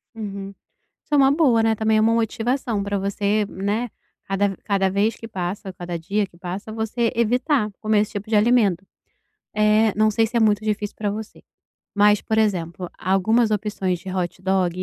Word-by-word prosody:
Uhum. 200 -3 -6 0.5
Isso - - -8
é - - +5
uma 270 -1 +5
boa, 280 -7 +3
né, 225 0 +2
também 220 0 +2
é - - +4
uma 225 +1 +3
motivação 230 0 -1
pra 200 0 -2
você, 200 +2 0
né, 205 +6 -2 0.3
cada 195 +1 0
ve 195 - -7
cada 195 -2 +1
vez 200 +4 +1
que 225 - -9
passa, 190 -1 -5
cada 175 -1 -5
dia 200 +5 -1
que 170 -3 -21
passa, 185 +4 -6
você 225 +1 -1
evitar 245 +1 +1
comer 215 -1 +2
esse 210 - -2
tipo 205 +1 -5
de 220 - +1
alimento. 210 -5 +3 0.7
Eh, 215 +1 +4
não 215 0 +4
sei 225 +1 +2
se 235 +2 -5
é - - +3
muito 215 -1 +3
difícil 210 -1 -2
pra 210 -1 -2
você, 215 +1 -7 0.5
mas 205 0 +4
por 220 - -2
exemplo, 180 -5 -1
algumas 215 +5 +2
opções 195 -3 -1
de 190 - -10
hot 180 0 -3
dog, 185 -1 0
210 Hz, 190 wpm, -22 LUFS, 195-225 Hz, 0.7 s, é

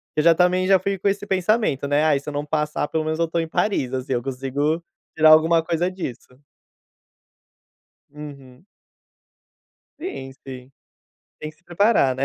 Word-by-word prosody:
Eu 155 - +2
já 170 0 +6
também 180 +1 +2
já 195 -1 +6
fui 195 +1 -2
com 200 - -1
esse 200 +1 -1
pensamento, 190 - 0
né: 145 +2 +2
"Ai, 150 -3 +3
se 140 - -19
eu 150 - -7
não 145 +1 -3
passar, 150 -1 -1
pelo 160 -1 -1
menos 155 0 -1
eu 170 - +1
estou 165 +1 -2
em 165 - -4
Paris, 160 -7 -1
assim, 130 +1 -4
eu 120 - 0
consigo 135 +5 -2 0.3
tirar 155 0 +5
alguma 160 +1 +5
coisa 170 +2 -1
disso." 130 -8 -8 1.7
Uhum. 140 -1 -12 1.3
Sim, 135 - -6
sim. 130 0 -10 0.7
Tem 155 - -6
que 155 - -25
se 170 - -35
preparar 175 - +2
né. 135 +1 -1
155 Hz, 170 wpm, -22 LUFS, 135-180 Hz, 1.7 s, já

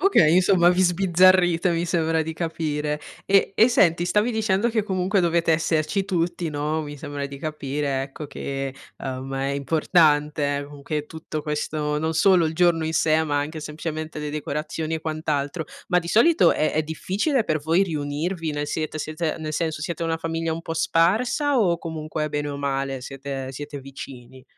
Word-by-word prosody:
Okay, 180 - +5
insomma, 180 -1 +5
vi 185 +1 +3
sbizzarrite 180 -1 +4
mi 170 +1 0
sembra 165 -1 +1
di 160 +1 -4
capire. 150 -3 -2 0.2
E 195 0 +3
e 225 +3 +6
senti, 175 -7 +3
stavi 210 +6 +1
dicendo 220 0 +1
che 225 -2 0
comunque 190 0 0
dovete 170 -1 +2
esserci 160 +4 +1
tutti, 175 -2 -1
no, 150 +2 -1
mi 145 0 -7
sembra 145 0 -4
di 140 0 -9
capire, 140 -2 -2
ecco, 140 +2 -7
che, 135 -1 -4 0.2
uhm, 130 0 -5
è 135 0 -1
importante, 145 0 +2
uhm, 145 -1 -12
che 150 0 -3
tutto 155 -1 -6
questo 150 0 -2
non 160 +1 -1
solo 185 0 +4
il 160 0 -1
giorno 170 -2 +3
in 160 - -2
sé, 160 0 +3
ma 145 -1 0
anche 155 +2 -3
semplicemente 155 0 -5
le 150 -1 -4
decorazioni 155 +2 -3
e 160 - -3
quant'altro. 155 0 -2 0.2
Ma 180 -1 +3
di 170 - -8
solito 310 - +5
è 155 - 0
è 155 - +1
difficile 205 - -1
per 155 -1 0
voi 165 +6 +2
riunirvi? 160 +2 -3
Nel 145 0 -2
siete 155 0 -3
siete 155 +1 -2
nel 155 -1 -4
senso, 160 -3 -2
siete 170 +1 -4
una 165 0 0
famiglia 165 0 -2
un 165 - -4
po' 165 - -4
sparsa 225 - +2
o 175 -6 +2
comunque, 155 -1 -4
bene 145 0 -2
o 140 - -5
male, 135 -1 -2
siete 135 0 -6
siete 145 +2 -7
vicini? 130 -1 -10
160 Hz, 180 wpm, -24 LUFS, 145-175 Hz, 0.2 s, e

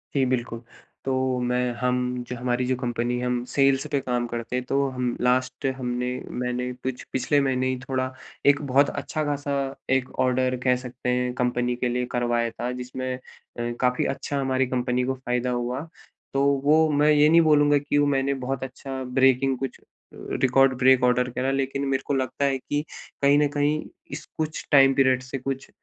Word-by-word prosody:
जी, 135 -2 +3
बिल्कुल 120 -2 -2 0.4
तो 135 - 0 0.3
मैं 125 0 0
हम 125 0 +1 0.3
जो 125 - -3
हमारी 125 +1 -1
जो 130 +1 +1
कंपनी 120 -1 -1
हम 125 0 -1
सेल्स 135 -1 +3
पे 140 - +2
काम 125 -2 -1
करते 120 +1 -4
हैं। 125 0 -2
तो 140 +2 +1
हम 125 -1 -2
लास्ट 125 +2 +1
हमने 125 -1 -2 0.3
मैंने 125 0 -2
कुछ 130 0 -5
पिछले 130 +3 +2
महीने 130 -1 0
ही 130 0 -1
थोड़ा 130 0 -2 0.3
एक 145 +1 +5
बहुत 140 +2 +5
अच्छा 155 - -3
खासा 145 -1 -2 0.4
एक 130 -1 -1 0.2
ऑर्डर 130 0 +1
कह 125 -1 +4
सकते 125 0 -5
हैं 125 0 0
कंपनी 125 0 0
के 125 0 -1
लिए 125 +1 -1
करवाया 120 -1 0
था। 120 +2 -4
जिसमें 125 +1 -4
अ, - - -11 0.6
काफ़ी 125 0 +2
अच्छा 140 - -4
हमारी 130 -1 +1
कंपनी 125 0 0
को 130 +1 0
फ़ायदा 125 -1 -2
हुआ। 125 +1 -2 0.5
तो 135 0 +2 0.2
वो 155 +2 +4
मैं 150 +1 +3
ये 150 0 +5
नहीं 165 +1 +6
बोलूँगा 145 -2 +4
कि 145 0 -1
वो 145 - +4
मैंने 135 +1 +1
बहुत 135 0 -2
अच्छा 130 0 -6
ब्रेकिंग 130 0 +4
कुछ 135 -1 -5 0.3
रिकॉर्ड 135 +1 +2
ब्रेक 130 0 +5
ऑर्डर 125 0 +3
करा। 130 +2 -1
लेकिन 135 +1 -1
मेरे 135 -1 0
को - - 0
लगता 130 +1 -1
है 135 -1 +1
कि 145 +3 -3 0.4
कहीं 140 +1 +5
न 150 - +3
कहीं 150 +1 +1 0.3
इस - - -6
कुछ 155 0 -3
टाइम 135 -2 +7
पीरियड 130 -1 +3
से 130 +1 -5
कुछ 135 +1 -5
130 Hz, 185 wpm, -25 LUFS, 125-135 Hz, 0.6 s, टाइम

